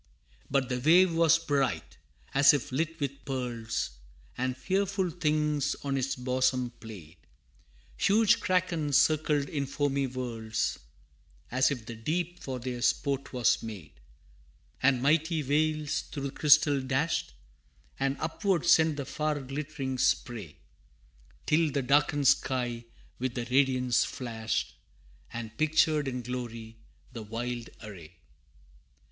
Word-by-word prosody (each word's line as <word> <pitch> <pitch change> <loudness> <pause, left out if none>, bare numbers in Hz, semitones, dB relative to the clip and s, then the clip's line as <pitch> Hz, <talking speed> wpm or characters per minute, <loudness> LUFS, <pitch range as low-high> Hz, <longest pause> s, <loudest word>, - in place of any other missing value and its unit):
But 135 -2 +1
the 125 -1 -2
wave 170 +6 +5
was 165 0 +5
bright, 145 -5 -1 0.3
as 140 +1 +6
if 145 0 -4
lit 160 +5 -2
with 140 -1 -4
pearls, 120 - -3 0.4
And 130 0 -2
fearful 190 +2 0
things 150 -3 0
on 140 -1 -1
its 135 0 -1
bosom 130 -1 0
played; 95 -7 -11 0.8
Huge 210 +2 +4
crakens 170 -6 0
circled 150 -1 +2
in 140 -2 -3
foamy 140 0 0
whirls, 120 -4 -3 0.7
As 130 +1 +3
if 125 -6 -4
the 115 - -7
deep 170 +10 -3
for 130 -2 -5
their 125 0 -5
sport 135 +3 0
was 125 -4 +2
made, 100 -10 -8 0.9
And 130 -2 +3
mighty 160 +2 +2
whales 155 +1 0
through 140 - -7
the 140 - -3
crystal 145 -1 +4
dashed, 135 +5 -1 0.7
And 135 0 0
upward 170 +2 -1
sent 160 -2 +4
the 140 - -3
far 150 +2 -2
glittering 135 -1 -4
spray, 110 - -1 0.9
Till 160 +1 +3
the 140 -1 -1
darkened 145 +1 +2
sky 125 -4 +1 0.3
with 130 -1 -2
the 120 -2 -3
radiance 125 -3 +3
flashed, 115 -3 -3 0.6
And 115 -1 -7
pictured 155 -1 +2
in 125 -2 -3
glory 115 -2 -6 0.4
the 115 - -6
wild 120 +2 -5
array. 90 -6 -10
135 Hz, 125 wpm, -29 LUFS, 125-150 Hz, 0.9 s, as